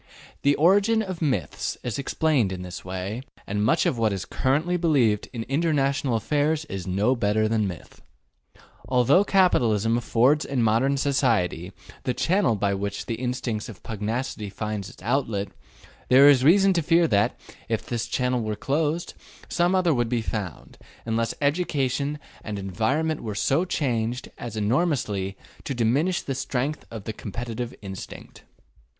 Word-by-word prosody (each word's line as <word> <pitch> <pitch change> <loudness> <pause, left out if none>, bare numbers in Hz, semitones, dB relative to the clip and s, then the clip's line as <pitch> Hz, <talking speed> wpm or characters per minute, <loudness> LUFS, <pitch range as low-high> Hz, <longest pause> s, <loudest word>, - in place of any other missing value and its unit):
The 145 0 +3
origin 205 +7 +4
of 185 -4 -6
myths 145 -5 -1
is 120 +2 -3
explained 140 -6 +1
in 90 -1 -5
this 90 -3 -7
way, 95 +5 -4 0.2
and 105 +1 -1
much 110 - +3
of 120 - 0
what 110 -2 +2
is 95 -2 -3
currently 150 +7 0
believed 140 - +2
in 115 -2 -4
international 140 -3 +1
affairs 150 +6 0
is 95 - -6
no 100 +8 +2
better 110 -1 +1
than 110 -2 +1
myth. 90 -3 -9 0.9
Although 130 +8 +4
capitalism 120 - +3
affords 125 +6 +3
in 130 -4 -1
modern 120 +6 +2
society 115 - +1 0.3
the 125 - -2
channel 165 - +2
by 100 0 0
which 100 +1 -3
the 115 - -3
instinct 120 -2 -3
of 105 - -11
pugnacity 110 0 -3
finds 105 -1 -4
its - - -15
outlet, 115 -5 0 0.6
there 135 +3 +8
is 135 -3 +6
reason 195 +6 +5
to 170 - +1
fear 165 +2 +3
that, 100 -2 +1 0.3
if 115 -1 -1
this 120 -2 -3
channel 125 -1 0
were 110 -1 -2
closed, 150 +8 -1 0.4
some 175 +2 +2
other 180 -3 +3
would 120 -3 0
be 120 -2 0
found, 100 -8 -5 0.3
unless 115 0 -1
education 145 -2 0 0.3
and 105 -2 -4
environment 115 - -1
were 105 -3 -5
so 140 - +1
changed 125 -7 -2
as 115 -2 -6
enormously 105 - 0 0.3
to 135 - -3
diminish 140 +11 +1
the 135 - -3
strength 130 +3 -3
of 110 -3 -7
the 110 - -5
competitive 120 +3 -5
instinct. 95 -1 -9
125 Hz, 155 wpm, -25 LUFS, 105-145 Hz, 0.9 s, there